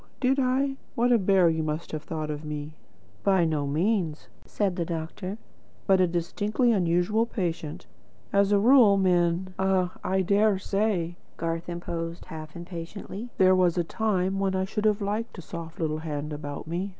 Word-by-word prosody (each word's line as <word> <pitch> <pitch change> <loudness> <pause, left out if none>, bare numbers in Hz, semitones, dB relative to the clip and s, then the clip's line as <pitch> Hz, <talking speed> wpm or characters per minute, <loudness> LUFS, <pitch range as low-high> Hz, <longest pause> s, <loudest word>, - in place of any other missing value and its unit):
Did 265 +1 +2
I? 270 +1 +1 0.2
What 245 +1 +2
a 235 - +5
bear 190 -2 +4
you 160 -1 +1
must 155 +1 -3
have 155 - -3
thought 155 -1 -4
me." 150 0 -5 0.5
"By 190 -3 +4
no 150 -3 0
means," 165 +1 0 0.2
said 195 -4 0
the 175 - -1
doctor, 170 +4 -5 0.5
"but 190 -2 +4
a 180 - +4
distinctly 205 +8 0
unusual 190 +3 +2
patient. 170 -5 -3 0.5
As 200 0 +4
a 205 - +5
rule, 225 -2 +6
men 180 -1 +2
" - - -26
"Ah, 190 -2 +2
I 190 0 +1
dare 200 +2 +3
say," 190 -4 -1 0.2
Garth 165 +1 -3
interposed 170 -1 -5
half 155 -1 -9
impatiently. 180 +6 -7
"There 185 0 +6
was 180 -2 +3
a 175 - +2
time 195 0 0
when 195 -1 0
I 190 0 +1
should 210 +2 -3
have 210 0 +3
liked 215 +3 -3
a - - -6
soft 165 0 -8
little 155 -2 -1
hand 150 -1 -4
about 145 -1 -6
me. 175 +5 -3
180 Hz, 175 wpm, -27 LUFS, 165-200 Hz, 0.5 s, rule